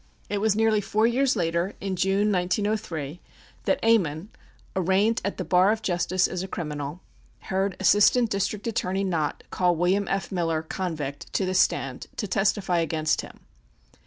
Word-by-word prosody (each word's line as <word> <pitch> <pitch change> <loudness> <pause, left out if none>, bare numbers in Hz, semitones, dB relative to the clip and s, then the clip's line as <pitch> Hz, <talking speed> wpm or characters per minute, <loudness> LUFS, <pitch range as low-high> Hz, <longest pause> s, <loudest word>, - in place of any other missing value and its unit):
It 205 - -1
was 215 0 +2
nearly 220 -1 +3
four 215 +2 +1
years 255 +3 +2
later, 170 +1 -1
in 195 -1 -3
June, 195 +3 +2
1903, 180 -5 -1 0.5
that - - +2
Ammon, 190 -6 +2 0.5
arraigned 190 +5 +2
at 200 - -3
the - - -2
bar 185 +3 +4
of 220 0 -2
justice 180 0 +1
as 185 - -4
a 190 - -4
criminal, 150 -2 -5 0.5
heard 190 0 0
Assistant 205 +5 +4
District 200 +1 -1
Attorney 195 -4 -1
Nott 165 -6 -1
call 180 -1 +2
William 185 +4 +1
F. 195 0 -2
Miller, 165 -4 -1
convict, 155 -5 -5
to 195 - +1
the 185 - -1
stand 135 -8 +1
to - - -3
testify 195 -2 +1
against 155 -1 0
him. - - -13
190 Hz, 160 wpm, -25 LUFS, 170-205 Hz, 0.5 s, bar